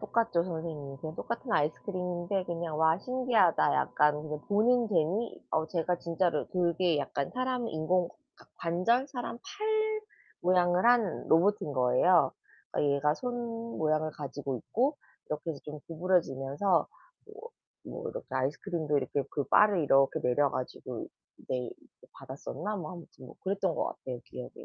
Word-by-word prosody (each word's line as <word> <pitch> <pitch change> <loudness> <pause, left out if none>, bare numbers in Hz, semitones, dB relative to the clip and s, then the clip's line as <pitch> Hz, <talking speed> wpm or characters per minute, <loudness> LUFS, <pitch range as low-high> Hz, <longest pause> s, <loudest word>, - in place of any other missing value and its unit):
똑같죠 215 -5 +1
선생님. 160 -5 -5
그냥 155 +2 -7
똑같은 235 +2 -4
아이스크림인데 180 +4 -1
그냥 170 -3 -3
와 160 +2 +4
신기하다. 250 -7 +3
약간 150 0 +2
그냥 150 -1 -5
보는 230 +3 +3
재미. 190 +5 0
어 160 0 +1
제가 175 +1 -1
진짜로 170 -2 0
그게 175 -2 +1
약간 140 -1 -2
사람 255 -2 -1
인공 170 +3 +1 0.3
과 - - -19
관절, 230 +11 +1
사람 245 -4 -5
팔 435 - -1 0.4
모양을 180 +2 +3
한 235 -8 +3
로봇인 175 -1 +3
거예요. 130 +5 +4 0.5
얘가 145 +1 +3
손 245 +4 -4 0.4
모양을 155 0 +1
가지고 140 -2 -4
있고 265 - 0 0.3
이렇게 150 +2 -3
해서 145 -4 -6
좀 150 0 -7
구부러지면서 170 0 +1 0.4
뭐 450 +2 -11 0.3
뭐 475 -1 -6
이렇게 - - -7
아이스크림도 150 +3 -1
이렇게 140 +2 -1
그 145 - -1
바를 205 - +5
이렇게 135 -1 +4
내려 140 +3 +2
가지고 130 - -5 0.4
내리 125 -2 -2 0.4
받았었나? 200 +10 -5
뭐 170 -2 -5
아무튼 170 -6 -12
뭐 - - -12
그랬던 190 -2 0
것 - - 0
같아요 125 -2 -6
기억에. 125 - -8
170 Hz, 320 characters per minute, -30 LUFS, 150-210 Hz, 0.5 s, 바를